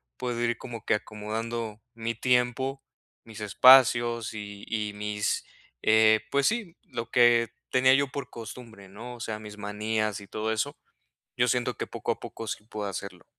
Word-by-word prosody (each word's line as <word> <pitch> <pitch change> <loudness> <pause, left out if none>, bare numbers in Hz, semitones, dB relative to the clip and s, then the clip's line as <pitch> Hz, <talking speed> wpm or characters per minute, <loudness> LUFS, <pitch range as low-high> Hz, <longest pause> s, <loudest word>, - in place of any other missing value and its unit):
puedo 120 -2 -3
ir 120 0 +1
como 120 -3 -8
que - - +2
acomodando 110 +1 -4
mi 115 0 -3
tiempo, 125 +3 +1 0.4
mis 110 -1 -10
espacios, 120 +1 +6
y 100 -1 -8
y 105 -2 -2
mis 105 0 -2 0.4
eh, 110 0 +5
pues 140 0 +3
sí, 215 -7 -2
lo 115 -2 -6
que 120 -2 +5 0.2
tenía 130 0 +5
yo 140 +1 +3
por 135 -1 -6
costumbre, 115 -3 -10
¿no? 115 +6 -9
O - - -13
sea, 110 -2 -4
mis 105 -1 -10
manías 105 +1 -2
y 100 - -12
todo 110 +2 -2
eso, 140 +7 -2 0.6
yo - - +3
siento - - 0
que - - -2
poco - - -2
a - - -8
poco 115 - -7
sí 105 - -5
puedo 105 -2 -5
hacerlo. 90 -2 -7
115 Hz, 170 wpm, -28 LUFS, 105-125 Hz, 0.6 s, espacios